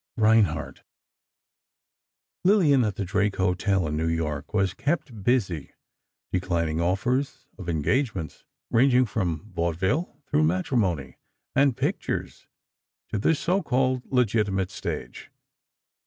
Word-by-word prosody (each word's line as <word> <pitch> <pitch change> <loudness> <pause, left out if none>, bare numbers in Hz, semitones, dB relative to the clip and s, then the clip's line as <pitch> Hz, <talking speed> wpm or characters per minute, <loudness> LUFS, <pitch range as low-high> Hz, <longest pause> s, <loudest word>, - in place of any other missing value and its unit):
X - - -3
REINHARDT 105 -8 +2 1.6
Lillian, 170 - +5
at 105 -3 -1
the 100 - -3
Drake 100 +3 0
Hotel, 95 0 +1
in 75 - -2
New 80 +2 0
York 80 -3 -2
was 95 -3 +1
kept 135 - -2
busy 95 - 0 0.6
declining 85 -3 0
offers 120 +10 0
of 90 -3 -6
engagements—ranging 115 - +1
from 100 -3 -3
vaudeville 90 - -1
through 75 - +2
matrimony 90 - 0 0.4
and 135 -2 +3
pictures - - -3 0.6
to 105 - -2
the 160 +10 +3
so 180 +6 0
called 130 -4 0
legitimate 105 -6 +1
stage. 60 -1 -6
100 Hz, 110 wpm, -26 LUFS, 85-125 Hz, 1.6 s, Lillian